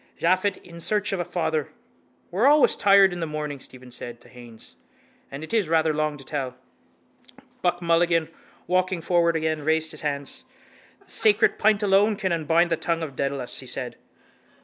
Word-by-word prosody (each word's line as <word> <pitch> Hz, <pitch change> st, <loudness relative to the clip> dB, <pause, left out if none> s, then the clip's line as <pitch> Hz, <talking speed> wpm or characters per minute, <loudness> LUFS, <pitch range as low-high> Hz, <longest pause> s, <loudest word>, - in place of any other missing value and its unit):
Japhet 185 Hz, +3 st, +1 dB
in 170 Hz, -1 st, -12 dB
search 205 Hz, +4 st, +1 dB
of 195 Hz, -, -2 dB
a -, -, 0 dB
father! 165 Hz, -4 st, -2 dB, 0.6 s
—We're 205 Hz, +9 st, +2 dB
always 295 Hz, 0 st, +5 dB
tired 195 Hz, -2 st, +5 dB
in 175 Hz, -, -6 dB
the 165 Hz, -, -2 dB
morning, 150 Hz, -2 st, -5 dB
Stephen 130 Hz, -1 st, -11 dB
said 120 Hz, -1 st, -6 dB
to -, -, -18 dB
Haines. 120 Hz, -2 st, -13 dB, 0.5 s
And 140 Hz, +3 st, -8 dB
it 160 Hz, -, -8 dB
is 210 Hz, -8 st, +1 dB
rather 160 Hz, -1 st, +2 dB
long 155 Hz, 0 st, -1 dB
to 135 Hz, -, -12 dB
tell. 130 Hz, -4 st, -4 dB, 1.0 s
Buck 175 Hz, 0 st, 0 dB
Mulligan, 170 Hz, -1 st, +2 dB, 0.4 s
walking 185 Hz, -1 st, 0 dB
forward 170 Hz, 0 st, +2 dB
again, 155 Hz, -1 st, -1 dB
raised 160 Hz, +1 st, +1 dB
his 155 Hz, -, -9 dB
hands. 145 Hz, -, -4 dB, 0.6 s
—The -, -, -5 dB
sacred 210 Hz, -2 st, +3 dB
pint 215 Hz, 0 st, +3 dB
alone 205 Hz, +2 st, +3 dB
can 195 Hz, -2 st, -2 dB
unbind 165 Hz, +1 st, +2 dB
the 165 Hz, -, +2 dB
tongue 165 Hz, 0 st, -2 dB
of 140 Hz, -4 st, -6 dB
Dedalus, 135 Hz, -2 st, -2 dB
he -, -, -10 dB
said. -, -, -4 dB
165 Hz, 175 wpm, -24 LUFS, 150-185 Hz, 1.0 s, always